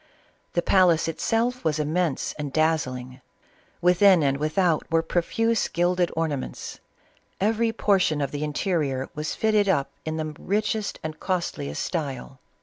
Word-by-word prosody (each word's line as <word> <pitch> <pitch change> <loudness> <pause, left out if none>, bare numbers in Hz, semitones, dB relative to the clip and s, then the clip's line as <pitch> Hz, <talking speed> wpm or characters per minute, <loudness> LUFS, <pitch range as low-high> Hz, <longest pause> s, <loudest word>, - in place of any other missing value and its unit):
The 175 - +1
palace 175 -4 +4
itself 230 +9 0
was 155 -1 +1
immense 155 0 -1
and 145 -2 -3
dazzling; 130 -5 -1 0.6
within 180 -1 +5
and 140 -1 +2
without 160 +2 +1
were 165 0 +3
pro 175 +2 +1
fuse 225 +5 0
gilded 175 +1 +1
ornaments. 155 -5 -3 0.6
Every 225 +3 +1
portion 195 -8 +2
of 140 -2 -1
the 145 0 -3
interior 150 -4 -1
was 150 0 -3
fitted 215 -2 +2
up 140 -7 +1
in 160 0 -3
the 155 -1 -3
richest 210 +1 -1
and 155 0 -5
costliest 170 - -2
style. 135 -6 -4
165 Hz, 140 wpm, -25 LUFS, 150-190 Hz, 0.6 s, within